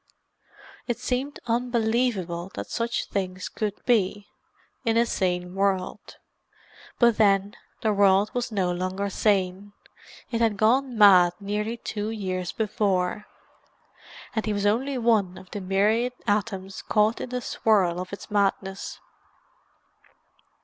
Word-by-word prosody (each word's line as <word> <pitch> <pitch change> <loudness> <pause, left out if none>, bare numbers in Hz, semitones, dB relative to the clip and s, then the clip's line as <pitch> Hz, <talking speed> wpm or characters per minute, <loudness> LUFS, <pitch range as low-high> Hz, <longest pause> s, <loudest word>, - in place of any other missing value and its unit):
It 240 -3 -1
seemed 255 +3 -3
unbelievable 230 -7 0
that - - -6
such 235 0 -1
things 185 -2 -3
could 210 -2 -4
be, 205 -3 +1 0.6
in 230 -2 +1
a 235 - +4
sane 180 -4 -1
world. 195 -1 -1 0.8
But 235 -2 +4
then, 200 -1 +3 0.3
the 215 -1 +2
world 200 +1 +4
was 245 -1 -2
no 190 -4 0
longer 185 +3 -2
sane; 195 0 0 0.6
it 230 -1 -1
had 220 -3 +2
gone 245 +4 +2
mad 185 -4 +7
nearly 210 +3 -3
two 210 -2 -4
years 185 -5 -3
before, 205 -2 -1 1.1
and 220 - 0
he 215 - +1
was 205 0 -1
only 255 +6 +1
one 220 -6 +2
of 185 - -14
the 205 - -5
myriad 210 +6 +1
atoms 200 -2 -2
caught 215 +1 +1
into 250 - -5
the 250 - -1
swirl 190 -8 +2
of 185 - -6
its 200 - -9
madness. 195 -1 -1
205 Hz, 130 wpm, -25 LUFS, 190-230 Hz, 1.1 s, mad